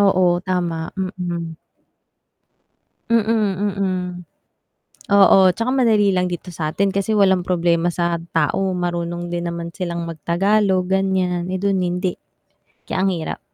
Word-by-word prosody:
Oo, 185 -3 +3
tama. 175 -3 -2
Mm. 175 -3 -4 1.6
Mm, 220 -3 +2 0.2
mm. 190 -2 -1 1.1
Oo, 200 -1 +6
'tsaka 230 +7 -2
madali 215 -6 +3
lang 180 0 0
dito 175 +1 -6
sa'tin 175 +5 -1
kasi 200 +2 0
walang 190 -3 +4
problema 175 -1 +1
sa 170 -1 -1
tao, 165 +4 +1
marunong 175 0 -3
din 170 0 -2
naman 170 0 -6
silang 170 -2 -3
magtagalog 185 +3 +1
ganiyan, 185 -2 0
eh, 185 - -2
dun 195 0 0
hindi. 180 +1 -1 0.7
Kaya - - -3
ang 195 - +2
hirap. 165 -2 -4
180 Hz, 125 wpm, -20 LUFS, 175-195 Hz, 1.6 s, Oo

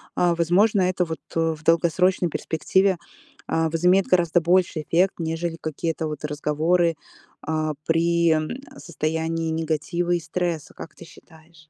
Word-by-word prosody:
а, 175 -1 +2
возможно, 190 +5 +3
это 180 0 +1
вот 160 -1 -6
в 160 -1 -1
долгосрочной 170 +2 +2
перспективе, 190 +5 +1 0.5
а, 160 0 +1
возымеет 180 +4 +3
гораздо 175 -1 +3
больший 175 -1 +2
эффект, 180 +5 +2
нежели 165 0 -3
какие-то 160 +1 -3
вот 150 -1 -5
разговоры, 160 +3 +1 0.5
а, 155 0 -2
при, 170 0 +2
э, 160 - -4
состоянии 160 0 -2
негатива 165 +2 -2
и 175 - +2
стресса, 170 -1 -3
как - - -10
ты 170 - -12
считаешь? 160 -1 -19
165 Hz, 135 wpm, -23 LUFS, 160-175 Hz, 0.5 s, возможно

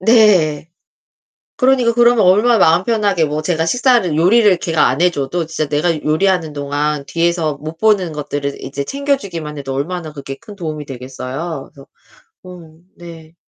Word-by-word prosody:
네. 185 -9 +3 0.9
그러니까 255 -2 +3
그러면 240 -2 +4
얼마나 220 +6 +4
마음 170 -1 +4
편하게 205 -7 +1
뭐 150 0 -2
제가 160 0 -1
식사를 240 - +2
요리를 195 +3 +4
걔가 165 -2 +1
안 130 - -2
해 180 +1 +4
줘도 165 +2 -3
진짜 155 -2 -3
내가 155 +2 0
요리하는 165 +1 +1
동안 145 0 -2
뒤에서 165 0 0
못 155 +2 -8
보는 205 -6 +2
것들을 145 -1 -4
이제 140 +1 -5
챙겨주기만 200 - -3
해도 135 -1 -5
얼마나 160 +3 -4
그게 140 -2 -7
큰 205 +7 -13
도움이 155 -4 -5
되겠어요. 135 +4 -7
그래서 135 -1 -15 0.6
음 170 -3 -13
네. 165 -2 -12
165 Hz, 345 characters per minute, -17 LUFS, 150-195 Hz, 0.9 s, 그러면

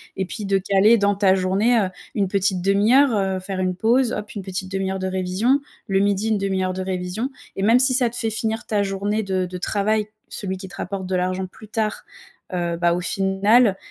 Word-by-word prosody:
et 190 - -1
puis 210 +3 -6
de 195 0 +2
caler 200 +4 +4
dans 200 -1 +2
ta 195 -1 +4
journée, 195 +6 +2
heu, 195 -3 0 0.3
une 200 -2 +1
petite 190 -1 0
1/2 200 +5 +3
heure, 280 -1 +6
heu, 190 -2 0
faire 190 0 -5
une 185 -1 0
pause, 235 +5 +2
hop! 210 0 -5
Une 205 - -4
petite 190 0 -5
1/2 195 0 -1
heure 190 - -3
de 190 - -2
révision. 190 +8 +1 0.3
Le 195 -2 +2
midi, 200 +2 +1
1/2 195 -3 0
heure 185 0 -1
de 190 - -4
révisions. 185 +6 -3 0.3
Et - - -3
même 230 +4 +5
si 260 0 +3
ça 250 -2 +2
te 235 - -11
fait 225 -2 -1
finir 220 +1 -2
ta 210 -2 0
journée 200 +2 -1
de 190 -2 -1
de 180 0 -6
travail- 210 +3 0 0.2
celui 190 -2 -4
qui 190 +1 -8
te 185 - -12
rapporte 195 -2 -4
de 185 0 -2
l'argent- 185 +1 -1
plus 215 +4 -15
tard, 215 0 -2 0.5
heu, 170 -1 -1
bah, 170 0 +2
au 180 - -2
final, 195 +4 +3
195 Hz, 230 wpm, -22 LUFS, 185-215 Hz, 0.5 s, heure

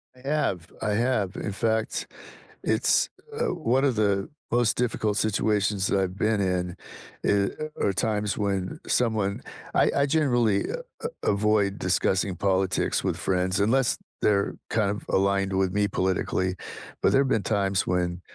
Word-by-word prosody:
I 130 +1 -12
have, 100 - 0
I 110 - 0
have. 110 -4 0
In 100 - -3
fact, 110 +2 -1 0.6
it's, - - +2 0.3
uh, - - +1
one 135 -6 +1
of 135 -4 +2
the 100 -2 +1 0.2
most 120 -2 +2
difficult 110 -3 0
situations 105 -2 +1
that 100 - +2
I've 95 0 -2
been 110 +1 +1
in 90 -2 -1 0.5
i 100 +10 -1
are - - +3
times 105 +1 -1
when 100 -3 -2
someone 110 -5 +1 0.3
I - - +4
I 140 - +3
generally 120 -9 +2
a - - -2 0.5
a - - +5
avoid 100 -1 +2
discussing 90 0 +1
politics 95 -1 +1
with - - -1
friends 90 +1 0
unless 120 +5 +2 0.2
they're 100 -1 +2
kind 105 -2 +1
of 105 +1 -4
aligned 100 0 +2
with 95 -1 +1
me 105 0 +1
politically, 95 0 0 0.5
but - - +4
there've 135 0 +3
been 110 -6 +1
times 100 -3 +1
when 90 0 -1
100 Hz, 150 wpm, -26 LUFS, 95-110 Hz, 0.6 s, a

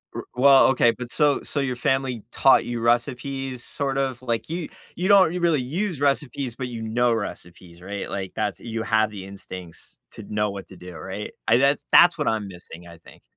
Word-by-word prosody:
R - - -4
well, 135 +2 +6
okay, 125 -3 +4
but, 125 0 -8
so 145 -2 +2
so 145 - -2
your 135 -2 -1
family 130 -3 -1
taught 135 - +4
you 120 -1 -3
recipes, 130 +2 -1
sort 135 -1 -2
of 130 -3 -2
like, 120 0 -3
you 170 0 -4 0.3
you 180 +2 -2
don't 190 -4 +6
you 180 - -2
really 165 -5 +2
use 165 +6 -3
recipes, 140 -3 -1
but 130 0 -4
you 120 -2 -6
know 120 +2 +1
recipes, 90 -5 -7
right? 100 +2 -6
Like, 95 -2 -5
that's 105 -2 -2
you 115 -1 -4
have 110 -1 +2
the 100 -3 -8
instincts 95 -3 -10
to 110 - -10
know 105 0 0
what 100 -1 -8
to - - -13
do, 90 0 -11
right? 95 +5 -6 0.2
I 115 - +5
that's 140 +2 +2
that's 175 -1 +7
what 150 - -2
I'm 110 -2 0
missing, 85 -2 -11
I 85 -1 -13
think. - - -18
120 Hz, 205 wpm, -24 LUFS, 105-140 Hz, 0.3 s, that's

